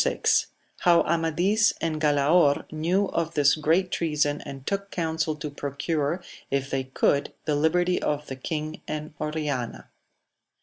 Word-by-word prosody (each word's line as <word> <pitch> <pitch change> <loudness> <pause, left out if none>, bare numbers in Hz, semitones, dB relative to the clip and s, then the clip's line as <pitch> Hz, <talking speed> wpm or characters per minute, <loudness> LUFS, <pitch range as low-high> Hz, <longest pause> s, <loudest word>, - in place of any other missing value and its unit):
— - - -17 0.3
How 175 -2 +5
Amadis 175 +6 +2
and 155 -2 -2
Gblaor 145 0 +3
knew 170 +6 +1
of 165 0 -2
this 145 -1 +5
great 165 +4 +1
treason 150 -3 0
and 135 -1 -9
took 200 0 -2
counsel 160 -3 -1
to 150 0 -6
procure, 145 +4 -2 0.3
if 135 0 -1
they 135 -1 -1
could, 140 +2 +1 0.2
thehbertj 160 +4 +2
of 150 0 -1
the 135 - -6
King 155 +3 -4
and 155 0 -5
Oriana. 150 -6 -3
155 Hz, 135 wpm, -26 LUFS, 145-170 Hz, 0.3 s, How